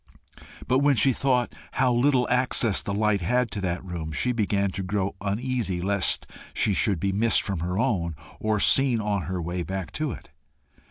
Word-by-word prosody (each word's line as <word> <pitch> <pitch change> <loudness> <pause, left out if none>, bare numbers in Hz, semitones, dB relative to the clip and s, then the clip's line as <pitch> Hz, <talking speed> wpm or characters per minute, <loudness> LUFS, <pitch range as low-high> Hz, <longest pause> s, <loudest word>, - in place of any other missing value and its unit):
But 130 +1 +3
when 140 0 +3
she 135 +2 +3
thought 125 -1 0 0.2
how 130 -1 +2
little 125 0 +3
access 125 -4 +2
the - - -4
light 105 -1 +1
had 125 +6 +1
to 100 - -3
that 90 0 -3
room, 85 -3 -5
she 125 +11 0
began 100 -4 0
to 95 - -4
grow 95 +1 -2
uneasy 105 -1 -2
lest 100 +1 +1 0.3
she 105 - +2
should 95 -2 +1
be 100 +3 0
missed 110 +4 +2
from 100 -5 -3
her 90 +3 -2
own, 90 - 0 0.2
or 110 -1 0
seen 130 +1 +4
on 105 -2 -1
her 90 +2 -3
way 85 +1 -3
back 95 -1 -4
to 155 -1 -2
it. - - -10
100 Hz, 185 wpm, -25 LUFS, 95-125 Hz, 0.3 s, seen